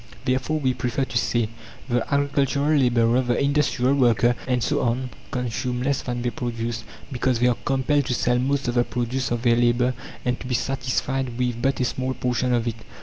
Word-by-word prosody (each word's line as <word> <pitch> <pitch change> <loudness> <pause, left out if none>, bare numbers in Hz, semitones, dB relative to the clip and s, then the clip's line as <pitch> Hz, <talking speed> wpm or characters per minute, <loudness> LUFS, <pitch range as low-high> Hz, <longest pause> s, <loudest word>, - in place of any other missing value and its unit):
Therefore 130 +5 0
we 130 -3 +1
prefer 125 +2 -1
to - - -9
say: 120 -2 0 0.4
The 120 -2 +1
agricultural 140 0 +1
labourer, 120 -2 +3
the 120 -1 0
industrial 140 -2 +2
worker 120 -3 +3
and 125 -2 +1
so - - +1
on 125 +2 -1 0.2
consume 125 0 -2
less 140 0 0
than 120 -1 -3
they 120 - 0
produce, 115 0 -3 0.3
because 130 -1 +1
they 120 - +2
are 125 -2 +3
compelled 135 +2 +1
to 125 - 0
sell 125 +1 +1
most 135 +1 0
of 120 - 0
the 120 0 +3
produce 125 +1 -2
of 120 0 -2
their 120 -2 +4
labour 120 +1 +2 0.3
and 125 0 0
to 125 - -7
be 125 - 0
satisfied 130 -1 -1
with 125 -2 -1
but 135 +2 +1
a - - +2
small 130 +1 -2
portion 125 0 0
of 120 -1 +1
it. 115 -1 -2
125 Hz, 200 wpm, -24 LUFS, 120-130 Hz, 0.4 s, their